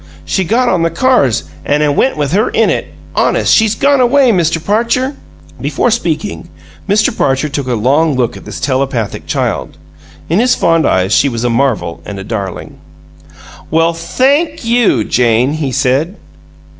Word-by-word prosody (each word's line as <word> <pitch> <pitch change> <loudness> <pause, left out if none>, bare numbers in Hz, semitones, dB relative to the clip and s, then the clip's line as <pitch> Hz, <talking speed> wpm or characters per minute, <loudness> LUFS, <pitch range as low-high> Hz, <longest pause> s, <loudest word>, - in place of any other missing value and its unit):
She 190 - 0
got 245 +8 +1
on 180 -6 +1
the 165 - +1
cars, 165 - +1 0.2
an' 150 +1 +1
it 145 -1 +1
went 265 - +1
with 145 -2 -1
her 210 +5 +1
in - - +2
it. - - -2 0.3
Honest, - - +2
she's 220 -1 +3
gone 280 +2 +2
away, 255 0 +4
Mr. 170 -4 +1
Parcher." 230 - 0 0.5
Before 245 - 0
speaking, 170 -5 -3 0.4
Mr. 210 +1 +2
Parcher 135 +3 0
took 140 -2 -4
a 125 - 0
long 140 +7 +1
look 125 -2 -1
at - - -11
this - - -8
telepathic 130 -5 -2
child. - - -2 0.5
In 170 +5 +1
his 245 +1 +3
fond 165 -1 +2
eyes 95 +2 +1
she 140 - +3
was 115 -2 -4
a 120 - +1
marvel 105 -11 -1
and 100 +2 -7
a 95 - -6
darling. 100 -4 -6 0.9
"Well 165 +1 +2
THANK 275 - 0
you, 230 - +2
Jane!" 120 +4 +1
he 150 -4 -2
said. 135 - 0
160 Hz, 170 wpm, -13 LUFS, -, 0.9 s, away